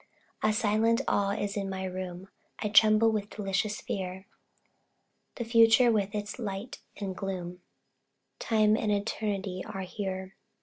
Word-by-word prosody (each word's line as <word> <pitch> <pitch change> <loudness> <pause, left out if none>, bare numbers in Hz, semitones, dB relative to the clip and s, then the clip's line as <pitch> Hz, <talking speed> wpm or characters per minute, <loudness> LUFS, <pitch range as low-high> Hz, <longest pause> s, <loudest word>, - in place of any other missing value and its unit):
A 215 - +3
silent 220 +2 +2
awe 200 0 +2
is 205 -1 -3
in 200 -2 -2
my 190 0 -4
room 185 0 -6 0.3
I 210 - -2
tremble 215 +1 +6
with 210 -1 -2
delicious 210 +3 -2
fear; 190 -3 -4 1.1
The 235 - -4
future 230 +1 +6
with 205 -1 0
its 210 +3 -4
light 205 +1 -5 0.2
and 195 -2 -4
gloom, 180 -2 -5 0.8
Time 215 -1 +3
and 215 -1 0
Eternity 200 -2 -2
are 195 - -6
here. 190 0 -5
205 Hz, 135 wpm, -29 LUFS, 190-215 Hz, 1.1 s, tremble